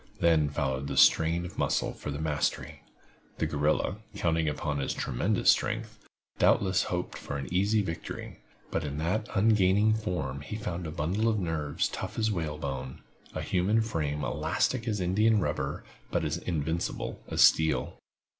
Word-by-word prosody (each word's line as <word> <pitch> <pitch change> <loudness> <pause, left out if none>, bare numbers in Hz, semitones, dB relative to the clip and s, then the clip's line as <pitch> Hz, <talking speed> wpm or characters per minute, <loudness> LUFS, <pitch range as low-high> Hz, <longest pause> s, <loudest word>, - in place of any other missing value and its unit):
Then 80 -3 +4
followed 65 -1 -2
the - - -4
strain 85 +2 +5
of 90 - -8
muscle - - +1
for - - -7
the 70 - -3
mastery. 75 -1 -2 0.6
The - - 0
guerrilla, 75 +6 0 0.2
counting 80 -2 +1
upon 75 -1 -2
his 70 - -2
tremendous - - +2
strength, 110 0 -2 0.4
doubtless 95 -1 +3
hoped 90 0 -3
for 70 - -5
an 70 -2 -5
easy 100 +3 +2
victory; 80 -3 -6 0.3
but - - -1
in 75 -1 -4
that 95 +8 -1
ungainly 105 0 +4
form 90 - -3
he 75 - -6
found 90 -5 -4
a - - -5
bundle 95 +10 0
of 110 - +1
nerves 80 -6 -1
tough - - -6
as 110 -1 +1
whale 80 -6 -2
bone—a 65 -3 -7
human 95 +5 +2
frame 75 -9 -2
elastic 80 - 0
as 105 -3 0
india 105 +5 +3
rubber 105 - -1 0.3
but - - 0
as 75 +2 -1
invincible 80 -1 -3
as - - +3
steel. 80 0 +3
85 Hz, 155 wpm, -29 LUFS, 75-105 Hz, 0.6 s, strain